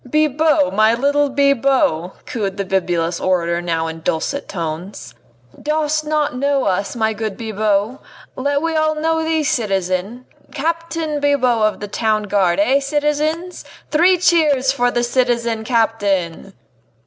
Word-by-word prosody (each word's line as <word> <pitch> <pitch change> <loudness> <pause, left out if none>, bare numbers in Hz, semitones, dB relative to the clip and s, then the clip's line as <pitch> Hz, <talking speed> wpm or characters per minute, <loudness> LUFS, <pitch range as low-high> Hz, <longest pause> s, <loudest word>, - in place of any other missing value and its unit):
"Bibot! 305 -1 +2
my 215 +3 +4
little 285 +3 +1
Bibot!" 270 - +1
cooed 200 -5 -3
the 200 - -2
bibulous 175 -3 -1
orator 170 -2 0
now 165 -2 -1
in 165 0 -5
dulcet 160 - -2
tones, 170 +1 -6 0.5
"dost 305 0 0
not 300 -2 0
know 280 +1 0
us, 195 +3 -1
my 220 -1 0
good 215 -2 -4
Bibot? 215 +1 -1 0.4
Yet 285 +2 0
we 330 -1 -1
all 310 0 +1
know 320 +1 0
thee, 320 -1 0
citizen 195 -1 -1 0.3
Captain 325 0 -2
Bibot 260 -5 +2
of - - -15
the 205 - -4
Town 215 +1 0
Guard, 195 -4 +1
eh, 255 +7 +3
citizens! 300 +5 -2 0.3
Three 355 +4 +4
cheers 300 -7 +3
for 245 -2 +1
the 240 0 -1
citizen 240 -2 0
captain!" 200 -6 -1
245 Hz, 135 wpm, -18 LUFS, 200-295 Hz, 0.5 s, my